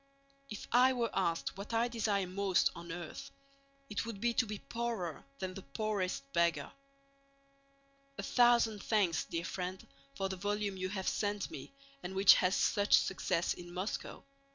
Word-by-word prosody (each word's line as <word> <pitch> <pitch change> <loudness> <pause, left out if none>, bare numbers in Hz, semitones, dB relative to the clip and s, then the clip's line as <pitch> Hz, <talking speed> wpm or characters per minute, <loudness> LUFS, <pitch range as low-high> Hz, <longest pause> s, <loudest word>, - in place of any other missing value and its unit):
If 210 - -7
I 255 +2 +6
were 235 -3 -1
asked 180 0 -1
what 210 +3 -4
I 230 +1 +3
desire 215 -5 0
most 185 0 +2
on 170 0 -8
earth, 170 -2 -7 0.6
it 210 - -2
would 230 -3 -6
be 235 +2 +1
to 240 0 +2
be 210 0 -4
poorer 230 -8 -4
than 185 -1 -4
the 195 - -7
poorest 200 - -2
beggar. 170 -1 +1 1.5
A - - -4
thousand 235 -4 +4
thanks, 200 -8 +2
dear 170 0 -3
friend, 185 0 -4 0.3
for 195 - -1
the 190 0 -4
volume 205 +1 -1
you 185 0 -3
have 190 -1 -4
sent 205 -1 -1
me - - -8 0.3
and 190 +2 -6
which 195 0 +9
has 185 +1 +2
such 205 -1 +4
success 180 -2 0
in 175 0 -10
Moscow. 185 +4 -4
200 Hz, 160 wpm, -34 LUFS, 185-220 Hz, 1.5 s, which